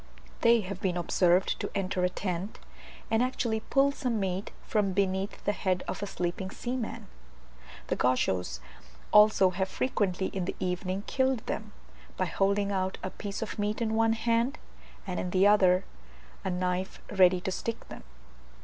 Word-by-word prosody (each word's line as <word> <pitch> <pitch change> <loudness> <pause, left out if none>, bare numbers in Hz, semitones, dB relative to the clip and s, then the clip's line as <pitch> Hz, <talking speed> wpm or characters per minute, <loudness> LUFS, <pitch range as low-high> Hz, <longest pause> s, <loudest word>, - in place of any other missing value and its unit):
They 230 -1 +5
have 195 0 -6
been 180 -2 0
observed 175 +1 +2
to - - -3
enter 185 -2 -1
a 180 - +3
tent, 185 +1 -4 0.5
and 225 +1 +3
actually 245 -3 0
pull 275 +5 +2
some 250 -6 -2
meat 190 0 -2 0.2
from 205 -3 +1
beneath 190 0 -1
the 205 - +2
head 185 -3 -1
of - - -4
a 205 - -2
sleeping 180 0 -3
seaman. 240 +2 -4 0.8
The - - -1
Gauchos 95 - +1 0.5
also 210 -3 +6
have 190 +1 -1
frequently 195 -6 0
in 185 -2 -3
the - - -3
evening 185 +2 -2
killed 260 -3 0
them, 215 -1 -4 0.5
by 185 - +1
holding 200 +3 +1
out 190 -1 -1
a 185 - -3
piece 205 +1 -5
of 220 - -6
meat 210 +1 -1
in 225 -2 0
one 225 0 +3
hand, 230 +4 +1 0.5
and 185 -3 -3
in 180 - -2
the 185 +2 +3
other 190 -3 +5 0.6
a - - -1
knife 180 +1 -2
ready 185 -2 +5
to 190 - -3
stick 230 +5 -4
them. - - -9
195 Hz, 165 wpm, -29 LUFS, 185-220 Hz, 0.8 s, also